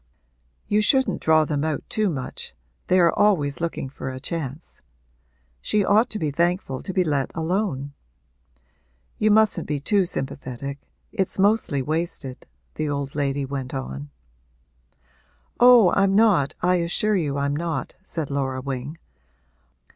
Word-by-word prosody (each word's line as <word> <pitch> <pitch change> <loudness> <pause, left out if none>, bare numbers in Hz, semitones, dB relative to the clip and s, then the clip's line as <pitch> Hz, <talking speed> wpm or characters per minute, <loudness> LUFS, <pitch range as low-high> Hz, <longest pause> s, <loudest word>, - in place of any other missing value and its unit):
You 210 +1 +2
shouldn't 260 -3 +2
draw 160 -1 +4
them 145 -1 -1
out 155 -2 -2
too 215 -2 0
much 135 - -6 0.3
they 185 - +4
are 170 -1 +4
always 165 -9 +2
looking 165 -5 -2
for 130 0 -7
a 130 0 -6
chance. 155 0 -6 0.8
She 210 -2 +1
ought 220 +5 +4
to 215 - -4
be 155 -6 -1
thankful 170 -3 -1
to - - -5
be 185 0 +2
let 145 -5 -1
alone. 160 -5 -2 1.3
You 215 - +3
mustn't 215 -5 +3
be 150 -1 -1
too 195 +7 +2
sympathetic 140 -2 -4 0.3
it's 195 -4 -1
mostly 195 -9 +2
wasted,' 155 -4 -4 0.3
the 155 - -2
old 140 -1 -3
lady 140 -1 -1
went 135 -1 -5
on. 65 +3 -5 1.5
'Oh, 240 -6 +7
I'm 195 0 +3
not 200 -10 +3
I 180 0 +3
assure 175 +5 +1
you 145 -6 -1
I'm 140 0 0
not,' 165 +1 -3
said 160 -6 -4
Laura 135 -2 -1
Wing. 135 +3 -5
155 Hz, 140 wpm, -23 LUFS, 140-190 Hz, 1.5 s, Oh